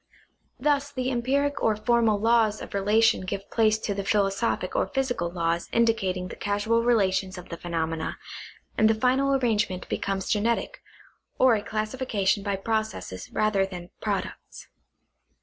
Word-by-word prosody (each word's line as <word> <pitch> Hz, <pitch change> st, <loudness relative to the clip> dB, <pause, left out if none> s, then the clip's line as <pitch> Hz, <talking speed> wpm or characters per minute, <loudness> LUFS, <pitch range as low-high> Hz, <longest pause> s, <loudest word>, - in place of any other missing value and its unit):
Thus 285 Hz, -1 st, +1 dB
the 255 Hz, -1 st, -2 dB
empiric 280 Hz, +4 st, 0 dB
or 220 Hz, -, +2 dB
formal 225 Hz, -1 st, +2 dB
laws 225 Hz, -1 st, +3 dB
of -, -, -9 dB
relation 215 Hz, +3 st, +3 dB
give 195 Hz, +1 st, -5 dB
place 215 Hz, -2 st, +3 dB
to 200 Hz, -2 st, -3 dB
philosophic 195 Hz, -1 st, 0 dB
or -, -, +1 dB
physical 265 Hz, -10 st, -1 dB
laws 170 Hz, -1 st, -1 dB
indicating 195 Hz, -6 st, +1 dB
the -, -, -8 dB
casual 205 Hz, +3 st, 0 dB
relations 195 Hz, -5 st, +1 dB
of 180 Hz, -, -10 dB
the 170 Hz, -, -5 dB
phenomena, 165 Hz, -2 st, -3 dB, 0.6 s
and 220 Hz, -, +4 dB
the 220 Hz, -, +3 dB
final 260 Hz, +4 st, +2 dB
arrangement 210 Hz, -8 st, 0 dB
becomes 195 Hz, -1 st, -2 dB
genetic, 230 Hz, -, 0 dB, 0.6 s
or 255 Hz, -2 st, +5 dB
a 215 Hz, -, +1 dB
classification 215 Hz, -2 st, -1 dB
by 200 Hz, 0 st, -1 dB
processes 215 Hz, -, -3 dB
rather 215 Hz, -2 st, +2 dB
than 180 Hz, -2 st, -7 dB
products. -, -, -4 dB
215 Hz, 140 wpm, -26 LUFS, 195-235 Hz, 0.6 s, or